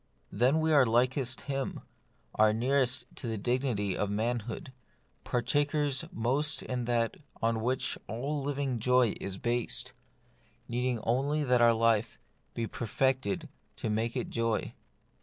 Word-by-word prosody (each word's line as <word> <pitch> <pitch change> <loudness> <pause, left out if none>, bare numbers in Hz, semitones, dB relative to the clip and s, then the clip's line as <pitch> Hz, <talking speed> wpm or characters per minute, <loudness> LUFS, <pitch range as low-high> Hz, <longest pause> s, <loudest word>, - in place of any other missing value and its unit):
Then 130 +6 +3
we 160 0 +2
are 140 -3 +7
likest 125 +2 +1
Him, 135 -1 -3 0.5
are 110 0 +4
nearest 130 +2 +1
to - - -4
the 110 -1 -2
dignity 120 -3 0
of 105 - -1
manhood; 115 +3 -2 0.5
partakers 145 +4 +1
most 140 +7 +1
in 125 -2 -3
that 115 -1 0 0.2
on 115 0 +1
which 125 +3 -1
all 135 +8 -2
living 135 -3 -1
joy 125 -1 +3
is 95 -1 -4
based, 120 +2 -1 0.7
needing 125 0 0
only 140 +6 +1
that 125 -3 +3
our 120 0 +7
life 115 0 +2 0.4
be 115 - -1
per 115 +1 -5
fected 135 - 0 0.3
to 110 - -3
make 115 +2 -1
it - - -3
joy. 115 -1 -1
125 Hz, 140 wpm, -30 LUFS, 115-135 Hz, 0.7 s, are